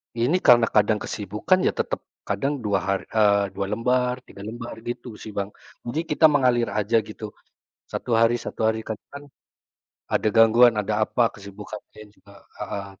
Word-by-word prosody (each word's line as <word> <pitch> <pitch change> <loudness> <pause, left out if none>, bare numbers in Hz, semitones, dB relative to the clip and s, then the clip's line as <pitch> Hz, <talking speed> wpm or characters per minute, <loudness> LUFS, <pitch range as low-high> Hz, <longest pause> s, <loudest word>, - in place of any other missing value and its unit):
Ini 125 +10 +2
karena 120 -2 +7
kadang 105 0 +2
kesibukan 105 - 0
ya - - +2
tetap - - -2 0.3
kadang 135 +8 -1
2 100 -3 +1
hari 100 0 0
eee, 100 -2 +4
2 100 - -2
lembar, 125 +2 0
3 100 -5 -12
lembar 115 +1 -7
gitu 120 -2 -6
sih, 110 - -9
Bang. 100 0 -1 0.4
Jadi 120 +6 -2
kita 150 - +4
mengalir 125 -5 +2
aja 110 +2 +1
gitu 105 0 -8 0.6
1 - - -4
hari 115 +1 +4
1 120 - -8
hari, 110 0 0
karena 110 -2 -5
kan 140 0 -8 0.9
ada 110 - +2
gangguan, 115 +2 +7
ada 105 +1 -1
apa, 120 - +1
kesibukannya 105 +1 -10
juga 100 - -21 0.3
heeh, 100 -1 -5
110 Hz, 160 wpm, -24 LUFS, 105-120 Hz, 0.9 s, karena